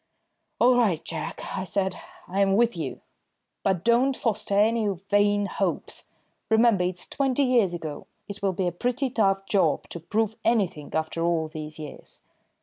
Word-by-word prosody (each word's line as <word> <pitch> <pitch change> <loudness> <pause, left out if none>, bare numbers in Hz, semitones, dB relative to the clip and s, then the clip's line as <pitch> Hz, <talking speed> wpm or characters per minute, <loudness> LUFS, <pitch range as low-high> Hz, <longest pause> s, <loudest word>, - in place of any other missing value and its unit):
"All 250 +1 +5
right, 195 -10 +2
Jack," - - -5 0.2
I - - -2
said, 190 0 -1 0.3
"I'm 195 +1 +2
with 235 0 +3
you. 155 -6 -5 0.6
But 185 -3 0
don't 250 +3 +3
foster 210 -3 0
any 220 +1 +3 0.2
vain 205 0 +3
hopes. - - -2 0.4
Remember, 220 -4 +4
it's 180 0 -2
twenty 275 0 +1
years 235 -9 +3
ago. 155 -3 -6 0.2
It 205 0 -7
will 195 -1 +1
be 185 +1 -1
a 175 - +1
pretty 250 - -1
tough 195 -4 +1
job 195 0 +1
to 170 - -6
prove 220 +5 -1
anything 195 -10 +1
after 160 +1 -1
all 165 -2 +1
these 155 -1 -7
years." 150 -2 -10
200 Hz, 155 wpm, -26 LUFS, 175-230 Hz, 0.6 s, All